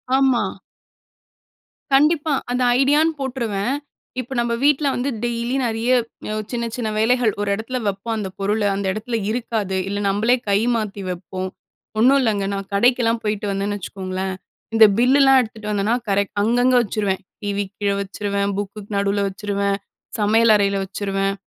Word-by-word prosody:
ஆமா. 265 -3 +3 1.5
கண்டிப்பா. 300 +1 +3 0.2
அந்த 250 +1 0 0.2
ஐடியான்னு 300 +4 +3
போட்டுருவேன். 245 -3 -2 0.4
இப்ப, 255 +1 -6
நம்ம 235 0 0
வீட்ல 290 0 +3
வந்து 255 +3 -1
டெய்லி 240 +2 -1
நெறைய 230 +1 -1 0.4
யோ 215 - -2 0.2
சின்ன 235 -1 -2
சின்ன 235 -3 -2
வேலைகள், 235 0 +3
ஒரு 205 - -1
எடத்தில 235 +5 -4
வைப்போம். 200 +3 -2
அந்த 195 -3 -3
பொருளை, 205 +2 0
அந்த 200 0 -3
எடத்தில 225 +3 -3
இருக்காது. 220 -5 -2
இல்ல, 205 +1 -2
நம்பளே 220 +5 +3
கை 200 0 +4 0.2
மாத்தி 210 -3 -3
வைப்போம். 185 +1 -5 0.5
ஒண்ணும் 270 +4 +5
இல்லங்க. 210 -5 +1
நான் 195 0 -4
கடைக்கெல்லாம் 235 +1 +3
போய்ட்டு 210 0 -2
வந்தேன்னு 200 +1 -2
வச்சுக்கோங்களேன், 190 0 -4 0.4
இந்த 225 -1 +8
பில்லுலாம் 270 +2 +5
எடுத்துட்டு 215 -2 -6
வந்தேன்னா 210 +3 +1
கரெக்ட் 200 0 +1
அங்கங்க 245 +3 +3
வச்சுருவேன். 200 -3 -1 0.2
டிவிக்கு 200 -1 -2
கீழே 200 -1 +2
வச்சுருவேன், 200 0 -2
புக்குக்கு 205 0 -5
நடுவுல 200 0 +1
வச்சுருவேன், 200 0 -1 0.4
சமையல் 220 +2 +4
அறையில 200 -1 +2
வச்சுருவேன். 195 0 -2
215 Hz, 145 wpm, -21 LUFS, 200-245 Hz, 1.5 s, இந்த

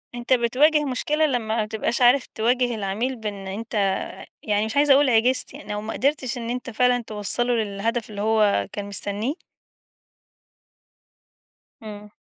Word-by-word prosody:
أنت 240 +2 0
بتواجه 270 +6 +3
مشكلة 295 +4 0
لمّا 235 -6 -1
ما 215 - +1
تبقاش 220 +3 -2
عارف 250 +2 +5
تواجه 245 +2 +1
العميل 215 +5 -2
بأن 205 -4 -6
أنت، 200 -1 -1 0.4
يعني 210 0 +1
مش 220 - -5
عايزة 290 -1 +6
أقول 280 0 +4
عجزت، 245 +3 +2
يعني 285 -5 -9
لو 210 - -3
ما 220 +1 -5
قدرتش 270 -2 -1
إن 230 -1 -5
أنت 250 +1 -4
فعلًا 250 +1 +2
توصَّله 220 +4 -1
للهدف 220 +1 -2
اللي 205 -1 -6
هو 210 - +2
كان 205 - -5
مستنيه؟ 205 +5 -2 2.5
إمم. 210 -1 -9
230 Hz, 145 wpm, -23 LUFS, 210-250 Hz, 2.5 s, عايزة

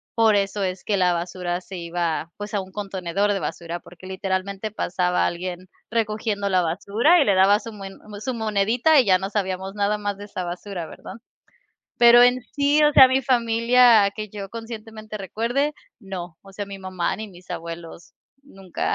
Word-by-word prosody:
por 225 -2 +4
eso 200 0 0
es 185 -1 -3
que 205 - 0
la 180 -1 +3
basura 175 +1 -3
se 185 0 -9
iba, 170 -1 -3
pues, 205 +1 -7
a 205 - 0
un 190 0 -11
contenedor 195 0 -1
de 195 - -1
basura, 170 -1 -5
porque 180 +2 -14
literalmente 190 +2 -3
pasaba 180 -3 0
alguien 180 +1 -5 0.2
recogiendo 215 -2 -1
la 185 -1 +3
basura 205 - +2
y - - +3
le 200 - +3
daba 195 +2 +5
su 230 - -9
muen 195 -2 -9 0.2
su 255 +4 -3
monedita, 225 +7 +2
y 250 - +4
ya 185 -2 +4
no 190 +1 -4
sabíamos 190 -1 -3
nada 205 +1 +1
más 205 -1 -3
de 205 - -9
esa 185 -3 -5
basura, 175 0 -6
¿verdad? - - -10 0.9
Pero 240 0 +8
en 245 +1 +4
sí, 290 +1 +3
o 295 - +4
sea, 265 -2 +9
mi 260 +1 +2
familia 235 -3 +4
que 215 -1 -5
yo 200 -1 -7
conscientemente 220 -1 -8
recuerde, 240 - -1 0.3
no, 180 -4 -7
o 195 - -15
sea, 205 +1 -5
mi 200 0 -8
mamá, 185 -2 -2
ni 220 0 -7
mis 180 -1 -16
abuelos 165 0 -8 0.3
nunca, 195 -10 -4
200 Hz, 185 wpm, -23 LUFS, 185-225 Hz, 0.9 s, sea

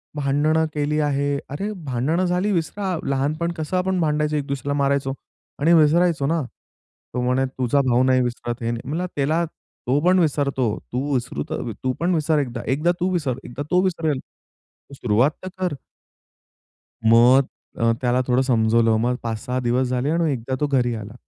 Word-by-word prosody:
भांडणं 150 +3 +2
केली 150 +1 0
आहे, 145 -1 0
"अरे, 195 +10 -3
भांडणं 140 +8 0
झाली 180 +3 0
विसरा, 185 +2 -1
लहानपण 150 +5 0
कसं 160 +3 -2
आपण 185 0 0
भांडायचो, 150 -1 +1
एक 145 -2 -1
दुसऱ्याला 140 +1 -2
मारायचो 140 -1 +1 0.5
आणि 160 +4 +4
विसरायचो 165 -1 +4
ना." 165 +2 +1 0.7
तो 125 - -1
म्हणे, 125 +2 +1
"तुझा 130 +1 0
भाऊ 120 +1 +4
नाही 130 0 +3
विसरत 120 0 -4
आहे." 115 0 -1
म्हणला 160 +7 -2
त्याला, 155 +4 +1
"तो 140 -4 -4
पण 185 +1 +5
विसरतो, 140 -6 +1 0.2
तू 140 +3 -1
विसरू 120 - -2
तू 130 0 -3
पण 175 +2 +1
विसर, 155 -1 +2
एकदा 125 -4 -3
एकदा 155 +6 +2
तू 180 +1 +1
विसर, 145 -8 -1
एकदा 125 +4 -6
तो 180 0 +4
विसरेल 165 -6 0 0.8
सुरुवात 120 +6 +3
तर - - -5
कर." 180 -5 -1 1.3
मग 120 +4 +6 0.3
अ, 115 0 +3
त्याला 125 0 +2
थोडं 125 0 +3
समजवलं. 115 -3 +3
मग 120 +2 +1
5-6 115 +2 -3
दिवस 125 +2 +1
झाले 125 +3 -1
आणि 165 -1 +1
एकदा 130 0 -3
तो 150 - +1
घरी 125 -4 +1
आला. 110 -1 -7
140 Hz, 165 wpm, -22 LUFS, 125-160 Hz, 1.3 s, मग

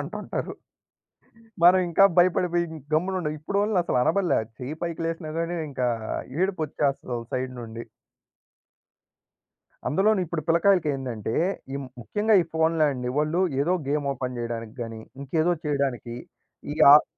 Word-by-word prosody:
అంటుంటారు. - - -5 1.1
మనం 180 +2 +8
ఇంకా 170 +3 +5
భయపడిపోయి 175 -1 +3 0.3
గమ్మునుండాం. 180 -1 0
ఇప్పుడోలిని 200 +5 0
అసలు 170 - 0
అనబడలే, 180 +6 +2 0.2
చెయ్యి 130 +5 -5
పైకి 170 -1 -3
లేసినా 165 -1 -4
గాని 170 +1 -1 0.2
ఇంకా 125 -2 0 0.5
ఏడుపొచ్చేస్తది 155 -8 -1
వోళ్ల 115 -1 -5
సైడ్ 130 0 -2
నుండి. 115 0 -7 2.0
అందులోన 195 +4 +3
ఇప్పుడు 165 -2 -4
పిల్లలకాయలకి 170 0 +3
ఏందంటే, 120 -5 -4 0.4
ఈ - - -2 0.2
ముఖ్యంగా 210 - +1
ఈ - - -7
ఫోనులాండి. 155 -6 +1
వాళ్ళు 155 +4 +1 0.2
ఏదో 175 +6 +2
గేమ్ 145 0 0
ఓపెన్ 125 -1 -4
జేయడానికి 115 -2 -5
గాని, 115 -1 -7 0.2
ఇంకేదో 160 +5 +1
చేయడానికి, 140 -5 -1 0.6
ఈ - - -4 0.2
ఆహ్ 150 - +9
155 Hz, 120 wpm, -25 LUFS, 130-175 Hz, 2.0 s, ఆహ్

